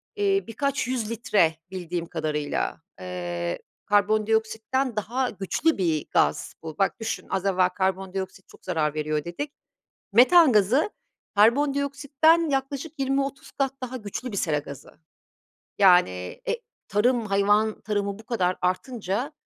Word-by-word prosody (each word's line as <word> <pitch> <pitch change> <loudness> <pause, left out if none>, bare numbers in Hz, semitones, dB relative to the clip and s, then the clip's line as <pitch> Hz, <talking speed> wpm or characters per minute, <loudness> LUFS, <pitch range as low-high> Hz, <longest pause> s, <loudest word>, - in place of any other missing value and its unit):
Eee, 400 -1 +2
birkaç 275 +3 -1
100 245 -4 -2
litre 205 -8 +2 0.2
bildiğim 175 -2 -4
kadarıyla. 155 -3 -2 0.2
Eee, 85 -1 -4 0.3
karbondioksitten 220 +4 +1
daha 240 +5 -1
güçlü 200 - 0
bir 165 -5 0
gaz - - +1
bu. 160 -2 -7
Bak 195 +3 +1
düşün 225 - -4
az 190 - -1
evvel 185 -2 +3
karbondioksit 190 0 -3
çok - - -19
zarar 155 -5 0
veriyor 155 -1 -1
dedik. 225 +13 -5 0.6
Metan 275 - +7
gazı 225 - +3 0.4
karbondioksitten 280 +7 +3
yaklaşık 280 +3 -3
20-30 275 0 -1
kat 270 -1 -1
daha 255 0 -4
güçlü 230 +2 -6
bir 200 - -4
sera 155 -5 +1
gazı. 140 -2 -10 0.8
Yani 95 - +4
e, - - +1 0.3
tarım, 230 +3 +2
hayvan 205 +2 +2
tarımı 205 -1 -2
bu 220 - -12
kadar 185 -6 0
artınca, 200 - -2
210 Hz, 125 wpm, -25 LUFS, 180-260 Hz, 0.8 s, Metan